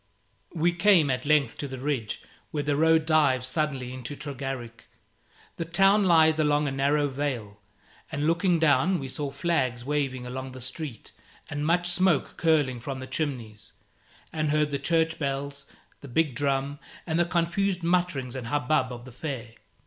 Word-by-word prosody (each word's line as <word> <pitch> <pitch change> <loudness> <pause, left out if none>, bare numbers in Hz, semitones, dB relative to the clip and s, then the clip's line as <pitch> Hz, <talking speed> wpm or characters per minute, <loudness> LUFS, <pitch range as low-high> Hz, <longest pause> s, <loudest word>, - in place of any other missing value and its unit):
We 170 +1 +2
came 175 -5 +4
at 130 +2 -2
length 145 -5 +2
to 145 - -3
the 130 -1 -6
ridge 130 -5 -3 0.3
where 150 -1 -2
the 145 0 0
road 160 +1 +4
dives 145 -6 +3
suddenly 130 -3 -2
into 130 +3 -6
Tregarrick. 135 -5 -6 0.7
The 165 - -3
town 195 +5 +4
lies 160 -3 +5
along 150 -1 +2
a - - -1
narrow 140 +2 +2
vale, 130 -7 -4 0.5
and 150 -1 -1
looking 170 +2 +3
down, 160 +3 +3
we 135 - -5
saw 140 +2 -3
flags 135 -5 -1
waving 135 -3 -1
along 130 +1 -6
the 130 - -9
street 130 -1 -6 0.4
and 145 0 -2
much 175 +3 +2
smoke 180 -3 +2
curling 150 -7 +2
from 135 +3 -5
the 130 - -6
chimneys, 130 -6 -4 0.6
and 155 -1 0
heard 150 0 +2
the 140 - -1
church 160 +2 +1
bells, 140 0 -3 0.3
the 140 - -11
big 145 +2 +1
drum, 140 +1 -1 0.3
and 160 -1 0
the 175 - +4
confused 175 +2 0
mutterings 170 -8 0
and 125 -3 -5
hubbub 145 -1 +1
of 120 0 -8
the 130 - -10
fair. 125 -2 -5
145 Hz, 165 wpm, -27 LUFS, 130-160 Hz, 0.7 s, lies